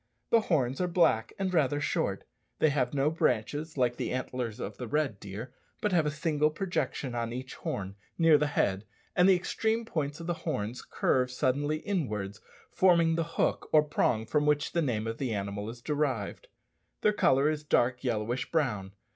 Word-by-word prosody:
The 230 - +6
horns 135 - 0
are 180 - +1
black, 170 -11 +2
and 190 -1 -1
rather 145 -3 +2
short; 150 - -1 0.3
they 155 - +4
have 130 -4 0
no 145 +1 +1
branches, 150 +1 -1
like 120 -2 +1
the - - -2
antlers 125 -3 -3
of 105 - -5
the 125 - -5
red 140 -6 0
deer, 105 +6 -7 0.3
but 210 - 0
have 165 -4 +3
a - - +2
single 150 0 +1
projection 155 -6 -2
on 115 -1 -2
each 130 +2 -6
horn, 95 -1 -4 0.2
near 165 -3 +6
the 150 - +2
head, 100 -8 0 0.3
and 180 +2 +5
the 190 - +7
extreme 220 +5 -1
points 150 -7 -3
of 165 - -7
the 175 - 0
horns 120 -7 -3
curve 125 -1 +1
suddenly 145 +4 0
inwards, 110 - -3 0.3
forming 170 -3 +4
the 165 0 +1
hook - - +1
or 155 -1 +6
prong 120 -7 +1
from 150 +5 +1
which 150 0 +2
the 170 - +1
name 115 -7 -1
of 115 0 -4
the 125 -5 -1
animal 100 +1 -4
is 120 +1 -10
derived. 150 - -2 0.5
Their 210 - +3
colour 135 -7 +3
is 155 -1 -1
dark 125 -3 +1
yellowish 120 0 -1
brown. 105 -12 0
145 Hz, 185 wpm, -29 LUFS, 120-160 Hz, 0.5 s, the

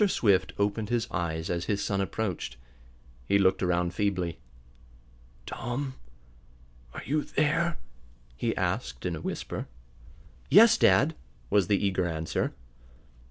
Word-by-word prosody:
Swift 100 - +2
opened 105 +1 0
his 120 -2 0
eyes 80 -3 -2
as 85 -1 -2
his 100 -1 0
son 100 -1 0
approached. 95 - -3 0.7
He 100 - +4
looked 95 -1 +3
around 90 -1 +1
feebly. 90 -4 -1 1.1
"Tom 130 +3 -4 1.0
are - - -8
you 150 +4 +1
there?" 165 +3 +1 0.6
he - - -2
asked 60 0 -2
in - - -1
a - - -7
whisper. - - -4 0.8
"Yes, 220 +9 +8
dad," 155 +4 +4 0.4
was 100 -4 +3
the 100 - +3
eager 95 -2 +1
answer. 80 -1 -2
100 Hz, 120 wpm, -28 LUFS, 90-120 Hz, 1.1 s, Yes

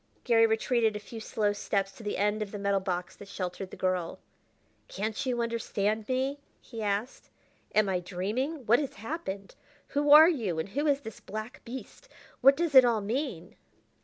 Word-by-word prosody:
Garry 225 -2 +5
retreated 225 0 +1
a - - -3
few 225 +2 -9
slow 210 -1 0
steps 200 -1 -1
to - - -14
the 210 -1 -3
end 210 +2 +1
of 205 -2 -4
the 210 - -5
metal 200 -1 +1
box 180 -2 -3
that 205 - -12
sheltered 185 -1 -5
the - - -10
girl. 185 -2 -1 0.7
"Can't 215 +2 -3
you 240 -2 0
understand 220 -2 -2
me?" 265 +2 0 0.2
he 230 -3 -9
asked. 210 +4 -3 0.5
"Am 215 -1 +4
I 185 -2 0
dreaming? 215 - -3
What 235 +3 +5
has 285 -3 -4
happened? 200 - -6 0.4
Who 290 +1 0
are 305 +2 +10
you, 225 - 0
and 160 +5 -3
who 290 +8 -1
is 285 -1 +2
this 225 -5 -9
black 215 +5 -7
beast? 265 - -9 0.3
What 275 +2 +7
does 335 -2 0
it 260 -1 +10
all 235 -3 +2
mean?" 220 - -3
220 Hz, 185 wpm, -29 LUFS, 200-255 Hz, 0.7 s, are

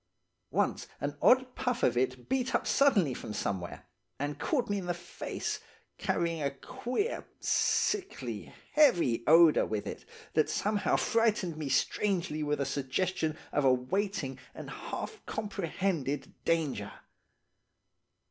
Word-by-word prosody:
Once - - 0
an 145 0 -2
odd 255 0 +5
puff 250 -2 -1
of 120 - +4
it 125 0 -1
beat 260 -1 0
up - - +1
suddenly 210 - +4
from 105 -3 -6
somewhere, 95 -3 -3 0.3
and 145 +1 -3
caught 255 -6 0
me 205 0 0
in 180 - -6
the 175 - 0
face, 175 0 -4 0.4
carrying 170 -2 0
a 140 - +1
queer, 250 - -3 0.2
sickly, 395 -2 0 0.2
heavy 175 - +4
odour 165 0 +7
with 105 -2 -2
it - - -6 0.3
that - - +3
somehow 210 0 +1
frightened 215 -7 +2
me 155 -3 -4
strangely 170 +2 +1
with 150 -1 0
a 140 - +1
suggestion 155 +4 -1
of 145 - +1
a 135 - +6
waiting 155 +3 -1 0.2
and - - -7
half 440 - -6
comprehended 185 -7 -2
danger. 165 -5 0
170 Hz, 130 wpm, -31 LUFS, 140-210 Hz, 0.4 s, odour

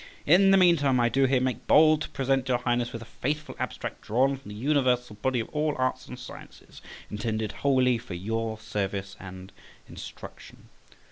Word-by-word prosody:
In 185 +6 +6
the 195 - +6
meantime, 150 -8 +4
I 120 0 +3
do 135 +3 +2
here 130 0 +3
make 130 -2 -2
bold 155 0 +6
to - - -4
present 135 -1 0
your 125 - +3
Highness 120 0 -1
with 115 0 -7
a 115 - -18
faithful 150 +3 -2
abstract - - -5
drawn 130 +5 +1
from 135 -4 -13
the 105 - -8
universal 125 -3 +1
body 130 +2 +1
of - - -8
all 150 0 -1
arts 130 0 -1
and 125 - -8
sciences, 125 - -12 0.3
intended 110 0 -2
wholly 130 -3 +2
for 105 -6 -8
your 110 +4 -3
service 100 -3 -4
and 95 0 -10 0.4
instruction. - - -11
125 Hz, 180 wpm, -27 LUFS, 110-135 Hz, 0.4 s, In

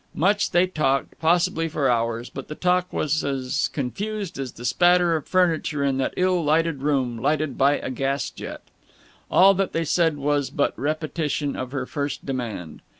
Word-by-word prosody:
Much 200 +6 +2
they 175 +1 +4
talked, 150 -7 0
possibly 165 +1 +2
for 145 -3 0
hours, 115 -1 0
but 135 - -7
the 150 - -6
talk 180 +1 +1
was 155 +1 0
as 135 -2 -1
confused 195 - -4
as 130 -3 -4
the 120 - -9
spatter 175 +4 +4
of 155 - -4
furniture 165 -5 +1
in 135 -1 +1
that 135 - 0
ill 180 -2 +2
lighted 155 -1 +1
room 130 -5 0
lighted 150 +1 0
by 140 +1 +3
a - - -5
gas 135 +2 -1
jet. - - -8 0.7
All 195 +2 +6
that 195 0 -1
they 165 0 0
said 160 -1 +2
was 145 -1 0
but 145 +1 0
repetition 150 -1 -2
of 130 -1 -5
her 135 -2 -3
first 145 +1 -4
demand. 115 - -5
150 Hz, 175 wpm, -24 LUFS, 135-170 Hz, 0.7 s, All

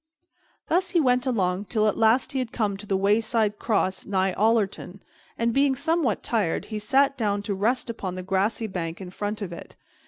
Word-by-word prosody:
Thus 365 +2 +1
he - - +6
went 250 -3 +2
along 195 -5 0
till 215 0 0
at 210 - +1
last 225 +3 +3
he 270 - -1
had 250 -2 -3
come 210 -5 -1
to 205 +1 -10
the 195 - +1
wayside 210 +1 +1
cross 195 -4 0
nigh 190 -1 0
Ollerton, 205 -3 0 0.4
and, 230 0 0
being 275 0 +3
somewhat 300 -4 0
tired, 210 -8 -1
he 215 - -2
sat 270 +6 +3
him 275 - -30
down 205 -3 -1
to 200 - -2
rest 230 +7 0
upon 195 -6 -4
the 185 - -5
grassy 195 +4 0
bank 175 -5 -4
in 185 -2 -8
front 210 +2 -4
of 180 -3 -6
it. - - -11
215 Hz, 200 wpm, -25 LUFS, 195-245 Hz, 0.4 s, he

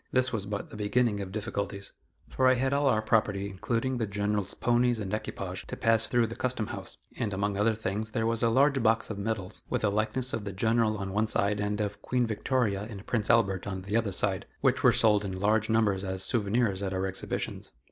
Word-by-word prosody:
This 125 0 +2
was 100 -3 -2
but 100 -1 -4
the - - -9
beginning 105 0 +1
of 95 -1 -6
difficulties, 100 -2 -4 0.4
for 130 - +2
I 130 - +6
had 130 +2 0
all 140 0 +2
our 110 -4 +2
property, 105 -3 +1
including 115 +6 -2
the 110 - 0
General's 100 0 -1
ponies 120 -1 +2
and 100 -1 -4
equipage, 110 - -4
to - - -6
pass 115 0 +2
through 120 -1 +3
the 115 +1 -6
Custom 125 -3 -1
house, - - -7 0.2
and 110 - -1
among 100 +1 -1
other 110 +2 +2
things 110 0 -3
there 110 0 -1
was 115 0 0
a 115 - +3
large 135 +3 +3
box 115 0 +2
of 100 - -5
medals, 100 -3 -3
with - - -1
a 105 - +3
likeness 110 +5 0
of 110 - -2
the 100 -1 -5
General 110 +2 +1
on 95 -1 -4
one 110 +2 +1
side 100 -1 +1
and 105 0 -1
of 105 -1 -3
Queen 125 -1 +1
Victoria 110 -2 0
and 100 -3 -9
Prince 110 -3 -1
Albert 100 -5 +3
on 95 -1 -4
the 100 +3 -3
other 115 -3 +1
side, 95 0 -1
which - - +2
were - - +7
sold 105 -2 +4
in 95 -2 -4
large 105 +2 +2
numbers 105 -4 +2
as 95 -1 -3
souvenirs 105 -1 +1
at 95 -1 -2
our 95 0 -1
exhibitions. 95 0 -4
110 Hz, 225 wpm, -29 LUFS, 100-115 Hz, 0.4 s, were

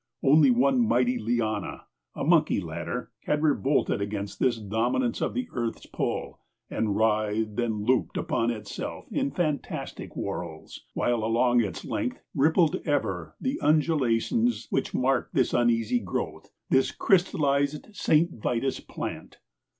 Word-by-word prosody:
Only 145 0 +6
one 130 +2 +3
mighty 125 +2 +2
liana 110 -2 -2 0.3
a - - -3
monkey - - +3
ladder - - -5
had 150 +1 0
revolted 140 -6 +2
against 100 0 -4
this 120 -3 +2
dominance 115 - 0
of - - -1
the 255 -1 -2
earth's 120 -2 -3
pull - - -3 0.3
and 105 -3 0
writhed 110 0 +1
and 110 -3 -1
looped 130 0 +2
upon 115 0 0
itself 105 -3 -5
in - - 0
fantastic 150 0 -3
whorls, - - -5 0.2
while 120 -2 +1
along 120 +2 +3
its 95 -6 -5
length - - -2
rippled 160 +3 +3
ever 95 - -1
the 270 +3 -2
undulations 155 - +2
which 135 - -1
mark 130 0 +1
this 130 - +2
uneasy 120 0 +2
growth, 90 -5 -4 0.2
this 130 0 +3
crystallized 145 -6 +1
Saint 170 -1 +2
Vitus 125 +4 -1
plant. - - -7
125 Hz, 130 wpm, -27 LUFS, 110-145 Hz, 0.3 s, Only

